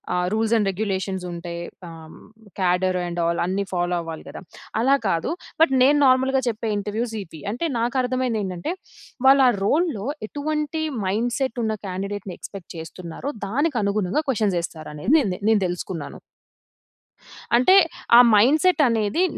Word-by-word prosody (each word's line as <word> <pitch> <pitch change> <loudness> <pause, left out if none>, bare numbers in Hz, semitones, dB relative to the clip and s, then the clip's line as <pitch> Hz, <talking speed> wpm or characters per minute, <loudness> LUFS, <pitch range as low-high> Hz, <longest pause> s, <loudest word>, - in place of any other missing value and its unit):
ఆహ్, 180 0 +1
rules 220 +1 +1
and 205 -3 +1
regulations 190 -2 -3
ఉంటాయి. 170 0 -6 0.3
ఆహ్, 160 -1 -12 0.5
కాడర్ 180 0 +1
అండ్ 175 0 -3
ఆల్ 170 0 0
అన్ని 195 +2 -1
ఫాలో 175 0 0
అవ్వాలి 165 -1 -8
గదా! - - -9 0.4
అలా 270 +4 +4
కాదు. 165 -3 0 0.3
బట్ 270 -5 +2
నేను 290 +2 +5
నార్మల్‌గా 260 +1 +3
చెప్పే 220 -1 -3
ఇంటర్వ్యూస్ 220 +3 -3
ఈపి. 160 -3 -13
అంటే 245 +10 -3
నాకర్థం 255 +2 0
అయింది 225 -3 -1
ఏంటంటే 185 - -4 0.5
వాళ్ళా 270 -1 +7 0.2
రోల్‌లో 295 - +1 0.2
ఎటువంటి 300 +3 -2 0.2
మైండ్ 225 +6 0
సెట్ 260 -3 -2
ఉన్న 220 -1 0
క్యాండిడేట్‌ని 195 0 -5
ఎక్స్పెక్ట్ 195 -4 -10
చేస్తున్నారో 165 - -7 0.2
దానికి 285 +7 0
అనుగుణంగా 200 - 0
క్వెషన్ 215 -6 +1
ఏస్తారు 160 -2 -7
అనేది 150 - 0
నెంతె 195 -10 -1
నేను 220 -2 +4
తెలుసుకున్నాను. 175 -2 -5 1.4
అంటే 255 +11 +5 0.4
ఆ - - +10 0.2
మైండ్ 265 +9 +5
సెట్ 365 -3 +4
అనేది 230 - +1
210 Hz, 145 wpm, -23 LUFS, 180-260 Hz, 1.4 s, ఆ